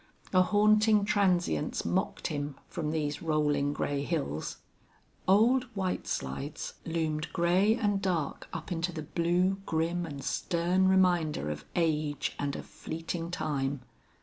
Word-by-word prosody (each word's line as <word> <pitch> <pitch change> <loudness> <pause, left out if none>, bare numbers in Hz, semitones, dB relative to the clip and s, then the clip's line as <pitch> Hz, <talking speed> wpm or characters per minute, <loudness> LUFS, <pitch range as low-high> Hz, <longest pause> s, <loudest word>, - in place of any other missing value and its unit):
A 185 - +6
haunting 210 +1 +4
transience 180 - +1
mocked - - -1
him 145 -2 -2
from 155 -3 -3
these 150 -2 -2
rolling 150 -3 +1
gray 145 -1 -1
hills. 140 - -2 0.7
Old 235 +7 +5
White 190 -2 -2
Slides 135 - -4
loomed 160 -2 -1
gray 185 +6 +3
and 205 -4 0
dark 175 -7 -1
up - - -6
into 175 +1 -1
the 160 -2 -5
blue, 175 +5 +1
grim 165 +2 0
and 140 -3 -7
stern 180 +5 +1
reminder 175 - +3
of 75 -1 -6
age 155 -3 0
and 140 -1 -1
of - - -6
fleeting 165 +1 -5
time. 145 -5 -2
165 Hz, 130 wpm, -30 LUFS, 150-185 Hz, 0.7 s, A